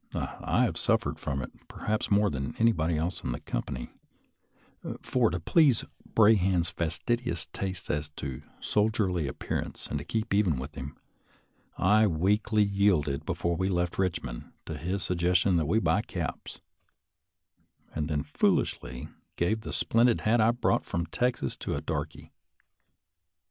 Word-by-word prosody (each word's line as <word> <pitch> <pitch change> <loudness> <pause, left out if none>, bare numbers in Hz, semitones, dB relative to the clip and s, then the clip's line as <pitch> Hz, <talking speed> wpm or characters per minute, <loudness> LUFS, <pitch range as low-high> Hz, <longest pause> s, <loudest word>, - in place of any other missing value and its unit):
I - - 0
have - - 0
suffered - - +1
from 70 -1 -2
it - - -7 0.2
perhaps 105 0 -2
more 100 -1 +3
than 70 -1 -4
anybody 85 -8 +2
else 85 +4 -2
in - - -1
the - - -5
company; - - -4 1.1
for, 125 -3 +2
to 90 - -2
please 140 - +4 0.3
Brahan's 95 -6 +4
fastidious 85 +2 -2
taste 95 -2 -4
as 75 0 -2
to 65 -3 -5 0.2
sol 105 +1 +2
dierly 90 -8 0
appearance 65 - -4
and 75 - -3
to - - -6
keep 110 +5 -2
even 100 -8 +3
with 65 +4 -6
him, 70 +1 -7 0.8
I 105 +3 +5
weakly 105 +5 +2
yielded 95 -8 +1
before 85 -1 0
we 95 +3 0
left 90 -1 0
Eichmond, 90 -10 -2
to 80 - -5
his 90 +5 -2
suggestion 90 +1 +2
that 80 -3 +1
we 105 - +2
buy 115 - +2
caps, - - -5 1.3
and 75 0 -2
then 75 -2 0
foolishly 60 0 0 0.3
gave 110 +6 0
the - - -6
splendid 115 +1 +3
hat 115 +2 +3
I 110 - +5
brought 120 0 +1
from 85 0 -2
Texas 120 +9 -1
to - - -3
a - - -3
darky. - - -4
90 Hz, 150 wpm, -29 LUFS, 80-105 Hz, 1.3 s, I